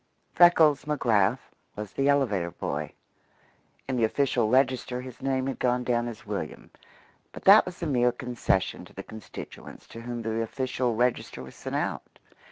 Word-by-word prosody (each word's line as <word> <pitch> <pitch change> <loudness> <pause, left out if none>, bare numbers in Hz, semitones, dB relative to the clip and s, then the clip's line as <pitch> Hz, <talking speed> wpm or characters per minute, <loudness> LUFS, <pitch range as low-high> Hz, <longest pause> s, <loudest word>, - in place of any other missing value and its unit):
Freckles 160 -5 +5
McGrath 120 -5 +1 0.2
was 105 -2 -6
the 140 +1 +1
elevator 110 -12 +2
boy. 75 -2 -4 1.0
In 130 -1 -1
the 115 - +1
official 120 -1 +1
register 130 0 +2
his 125 -1 -10
name 130 -1 0
had 135 - -3
gone 125 0 +1
down 120 -1 0
as 115 -3 -8
William, - - -5 0.6
but - - -11
that 200 +1 +8
was 180 -1 -7
a - - 0
mere 125 -5 +2
concession 120 -8 -1
to - - -17
the 100 - -7
constituents 110 +1 -10
to 115 - -9
whom 120 0 -5
the 110 0 -1
official 125 0 -1
register 120 - -1
was 65 - -11
sent - - -6
out. - - -3
125 Hz, 165 wpm, -27 LUFS, 110-135 Hz, 1.0 s, that